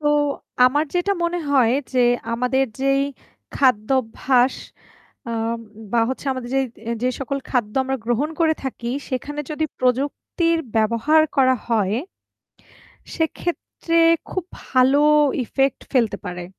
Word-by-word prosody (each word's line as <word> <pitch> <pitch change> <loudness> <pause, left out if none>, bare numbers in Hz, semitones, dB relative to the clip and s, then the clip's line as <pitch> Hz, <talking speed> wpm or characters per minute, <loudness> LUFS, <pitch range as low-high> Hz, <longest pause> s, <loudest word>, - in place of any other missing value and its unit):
তো 295 - -3 0.6
আমার 290 +4 +2
যেটা 355 +3 +1
মনে 340 +1 0
হয় 255 -5 +4 0.2
যে, 255 - 0 0.3
আমাদের 250 +3 +1 0.2
যেই 275 0 +2 0.5
খাদ্যাভ্যাস 255 +1 +2 0.8
আম 230 0 -2 0.3
বা 235 - +3
হচ্ছে 265 +2 -5
আমাদের 255 -2 -6
যেই 270 0 +2 0.4
যে 250 - +2
সকল 275 +1 -2
খাদ্য 230 -5 0
আমরা 265 0 -1
গ্রহণ 245 +6 0
করে 320 -1 +4
থাকি, 240 -2 -4 0.2
সেখানে 290 +3 -4
যদি 310 +1 -1
প্রযুক্তির 285 +6 0 0.2
ব্যবহার 230 +8 +3
করা 260 -1 +5
হয়, 215 -3 +1 1.2
সেক্ষেত্রে 335 0 -2 0.3
খুব 370 - -3 0.2
ভালো 260 +2 +4 0.4
ইফেক্ট 270 +3 0
ফেলতে 230 -6 +2
পারে। 180 0 -5
260 Hz, 120 wpm, -21 LUFS, 235-290 Hz, 1.2 s, করা